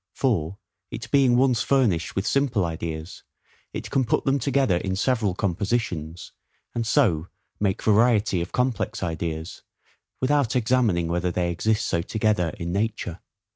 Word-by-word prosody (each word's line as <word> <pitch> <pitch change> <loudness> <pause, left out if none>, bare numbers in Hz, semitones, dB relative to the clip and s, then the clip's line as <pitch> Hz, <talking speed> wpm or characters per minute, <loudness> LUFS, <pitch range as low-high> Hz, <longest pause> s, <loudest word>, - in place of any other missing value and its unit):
For, 100 - 0 0.3
it 115 -1 -7
being 130 -3 +4
once 125 -3 +3
furnished 110 -13 +1
with 95 - -1
simple 130 -9 +1
ideas, 80 0 -5 0.5
it - - -6
can 135 -2 +2
put 115 - 0
them 140 +1 +2
together 135 -6 +2
in 95 +1 -2
several 110 -3 +1
compositions, 90 -4 -2 0.4
and 115 -1 -2
so 90 - +2 0.3
make 100 -1 0
variety 110 -4 +3
of 85 - -5
complex 120 -4 -1
ideas, 80 -1 -4 0.6
without 140 -2 +1
examining 110 -8 +2
whether 85 +1 0
they 85 0 -1
exist 110 +5 0
so 85 - 0
together 105 -2 0
in 85 -2 -4
nature. 100 -3 -2
105 Hz, 140 wpm, -24 LUFS, 85-120 Hz, 0.6 s, being